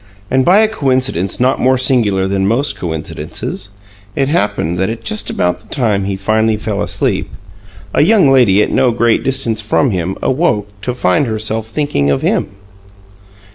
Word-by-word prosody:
And 130 0 +3
by 190 +9 +5
a 220 - +4
coincidence 130 - -1
not 130 +2 +2
more 130 +1 +3
singular 115 -7 +2
than 95 0 0
most 130 +7 0
coincidences, 85 +3 -5 0.5
it 135 0 0
happened 95 - -1
that 95 - 0
at 115 0 -6
just 105 -1 -1
about 90 0 -1
the 110 - -22
time 105 -7 0
he 100 0 -2
finally 110 +3 +1
fell 105 -1 -3
asleep, - - -1 0.6
a - - +3
young 195 0 +4
lady 110 -6 +4
at - - -3
no 130 - +3
great 115 -1 +1
distance 120 -5 0
from 115 +5 +1
him 95 0 -3
awoke 125 -8 0
to 125 +4 -3
find 120 +4 +1
her 110 -1 -2
self 110 0 -2
thinking 110 - -1
of 70 -1 0
him. - - +1
110 Hz, 175 wpm, -15 LUFS, 100-130 Hz, 0.6 s, by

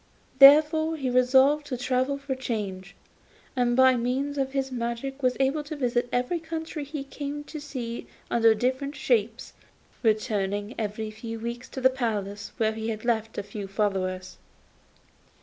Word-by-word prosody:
He - - -29
therefore 310 +3 +7
resolved 265 +2 +3
to 255 - -3
travel 255 +3 0
for 280 -1 -4
change, 200 -8 -4 0.6
and 245 -1 +2
by 260 0 +6
means 270 +4 -1
of 270 0 -1
his 270 -1 -1
magic 235 +2 -3
art - - -18
was 255 -1 +1
able 275 +3 +1
to 310 - -5
visit 245 -3 0
every 250 +8 0
country 320 -1 -5
he 285 0 -5
came 285 +1 -6
to 305 0 -8
see 250 -5 -6 0.2
under 225 -1 +5
different 260 +5 -1
shapes, 230 -3 0 0.5
returning 210 -2 0
every 215 0 -3
few 225 +1 -7
weeks 235 +2 -5
to 265 - -6
the 260 +1 +5
place 210 -6 -3
where 220 -1 +2
he 220 +1 -4
had 215 0 -5
left 225 -2 0
a - - -2
few 200 0 -7
followers. 190 -2 -2
250 Hz, 160 wpm, -26 LUFS, 220-275 Hz, 0.6 s, therefore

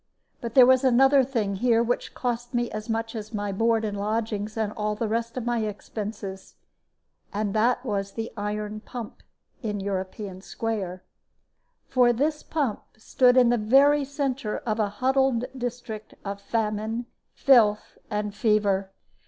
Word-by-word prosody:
But 235 -2 -5
there 255 -2 +9
was 260 +1 +5
another 270 +2 +5
thing 220 -7 -1
here 235 +1 +3
which 245 +1 -2
cost 245 0 -3
me 240 0 0
as 215 +2 -6
much 225 +1 -2
as 215 0 -6
my 205 -1 -2
board 225 +2 +2
and 205 -1 -3
lodgings 215 +1 -2
and 215 -1 -1
all 210 0 -2
the 225 +1 -2
rest 230 +2 -2
of 245 - -3
my 240 -1 +1
expenses. 205 -2 -5 0.8
And 205 -1 -2
that 245 +4 +2
was 200 -3 -2
the 225 0 -4
iron 210 0 -3
pump 230 0 -8 0.4
in 210 -4 -2
European 190 0 -4
Square. 195 -4 -4 0.8
For 245 -2 +4
this 300 +5 0
pump 280 -9 -2 0.2
stood 250 +3 +3
in 250 -2 +6
the 240 - +3
very 280 +7 +5
centre 270 -5 -2
of 220 -1 -1
a 210 -2 +2
huddled 260 +2 +1
district 240 -3 -6
of 200 0 -4
famine, 220 +2 -2 0.3
filth, 220 -6 +4
and 210 -1 -2
fever. 205 -2 +1
225 Hz, 150 wpm, -26 LUFS, 210-245 Hz, 0.8 s, there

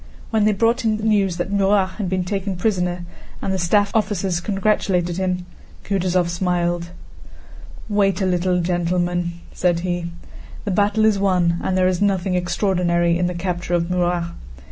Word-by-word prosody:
When 220 -2 +2
they 215 - +4
brought 230 +5 +2
him 220 -1 +1
news 205 -5 +1
that 175 +2 -3
Murat 195 -1 +2
had 195 -4 -1
been 185 0 0
taken 195 +1 -2
prisoner, 180 -2 -1 0.3
and 190 - -2
the 190 - -1
staff 200 +4 +2
officers 195 -5 0
congratulated 190 -3 0
him, 180 -1 -1 0.4
Kutúzov 185 -2 +1
smiled. 175 -1 -1 1.0
"Wait 200 -3 +2
a 190 - +1
little, 180 0 +1
gentlemen," 175 0 0 0.2
said 175 -2 +1
he. 175 -1 -2 0.6
"The 205 - -1
battle 205 +3 +2
is 215 -2 +3
won, 180 -3 +2
and 185 - 0
there 185 0 +3
is 185 0 0
nothing 195 -2 +1
extraordinary 175 -1 +1
in 175 +1 +1
the 180 - -3
capture 175 0 -2
of 170 0 -1
Murat. 175 -1 0
180 Hz, 160 wpm, -21 LUFS, 175-200 Hz, 1.0 s, they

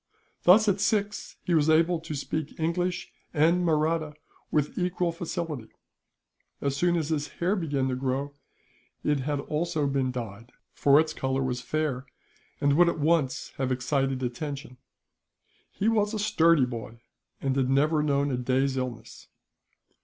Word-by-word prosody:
Thus, 215 +5 +7
at 200 -1 +2
six, 205 0 -1
he 175 - 0
was 155 -1 +3
able 165 +2 +4
to 160 -2 -6
speak 155 +2 -4
English 175 +2 -1 0.2
and 165 +4 +3
Mahratta 155 -1 +1 0.3
with 150 -1 0
equal 180 -1 0
facility. 165 -6 -4 0.9
As 140 -1 -1
soon 175 +4 +2
as 160 -2 -2
his 150 -2 -1
hair 180 +4 0
began 145 -8 -1
to 130 - -1
grow, 135 +2 -2 0.7
it 150 -1 +1
had 145 +2 -1
also 155 +1 -1
been 135 -2 0
dyed; 115 -1 -7 0.2
for 140 +1 +5
its 155 0 +1
colour 130 -1 -1
was 125 -1 -2
fair, 140 -1 -2 0.5
and 140 0 +3
would 175 0 +6
at - - -2
once 155 -3 +1
have 130 -1 -1
excited 130 +1 0
attention. 135 +2 -5 0.9
He 205 - -2
was 215 -1 +2
a - - -1
sturdy 170 -9 +4
boy, 115 -1 -7 0.4
and 135 -1 -1
had 130 -2 +1
never 150 +3 +3
known 140 -1 +1
a 125 - 0
day's 130 +2 0
illness. 120 -3 -6
150 Hz, 155 wpm, -27 LUFS, 130-170 Hz, 0.9 s, Thus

